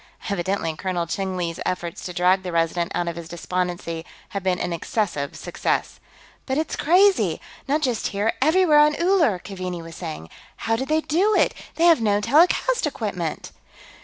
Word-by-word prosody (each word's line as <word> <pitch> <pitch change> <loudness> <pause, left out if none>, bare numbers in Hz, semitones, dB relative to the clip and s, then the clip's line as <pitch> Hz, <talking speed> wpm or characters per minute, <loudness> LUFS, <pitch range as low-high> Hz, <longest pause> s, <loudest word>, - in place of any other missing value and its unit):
Evidently 180 -3 -1
Colonel 180 0 -2
Cheng 190 +2 -3
Li's 170 -2 -3
efforts 175 -2 -3
to 180 - -4
drag 180 +2 +3
the 185 -1 -5
Resident 170 +1 0
out 175 - -1
of 170 - -3
his 170 -1 -8
despondency 175 -1 -3 0.3
had 200 - -4
been 185 -1 +1
an 180 - -2
excessive 170 -5 -2
success. - - -2 0.5
"But 265 0 0
it's 315 0 -1
crazy! 375 +5 +3 0.3
Not 300 +3 +1
just 245 -5 0
here; 205 +3 0
everywhere 315 +1 +5
on 300 0 +5
Uller!" 340 - +3
Keaveney 180 -2 -6
was 165 0 -10
saying. 155 - -7 0.3
"How 225 - +2
did 265 +4 -3
they 310 +1 +2
do 380 +8 +2
it? - - +3 0.2
They 330 - 0
have 335 -7 +6
no 205 -2 +2
telecast 340 - +3
equipment." - - -4
195 Hz, 170 wpm, -23 LUFS, -, 0.5 s, have